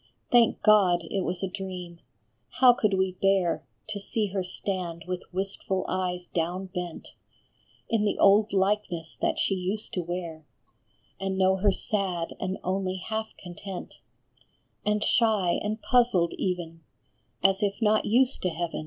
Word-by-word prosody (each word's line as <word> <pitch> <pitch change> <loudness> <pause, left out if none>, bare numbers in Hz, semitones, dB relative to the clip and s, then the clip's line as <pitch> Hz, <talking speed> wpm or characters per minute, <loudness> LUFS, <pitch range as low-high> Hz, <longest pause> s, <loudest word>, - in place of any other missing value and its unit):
Thank 240 -2 +4
God, 190 -5 +5
it 195 - 0
was 175 +2 -3
a - - +1
dream! 180 -3 -7 0.6
How 250 -1 +8
could 215 -4 +1
we 190 -1 0
bear 195 -3 +2 0.3
To 210 -1 -3
see 215 +2 -1
her 190 0 -2
stand 180 -3 -4
with 180 0 -5
wistful 190 0 -2
eyes 180 -1 -2
down 180 +3 -3
bent, 180 -3 -5 0.8
In 225 -3 +1
the 205 - 0
old 205 +2 +5
likeness 190 -4 0
that - - +1
she - - +1
used 190 +3 -3
to 180 - -1
wear, 170 -2 -5 0.8
And 195 0 -2
know 190 0 +3
her 200 +1 +3
sad 185 -4 -2
and 185 +1 -2
only 185 0 -1
half 220 +4 -4
content, 180 +1 -8 0.8
And 210 0 +1
shy 215 -7 +2
and 215 +2 -2
puzzled 235 -9 +3
even, 170 -3 -3 0.6
as 195 +1 +4
if 200 -1 0
not 215 -1 +3
used 250 +4 +2
to 185 - +1
heaven 170 0 -3
190 Hz, 150 wpm, -27 LUFS, 180-210 Hz, 0.8 s, How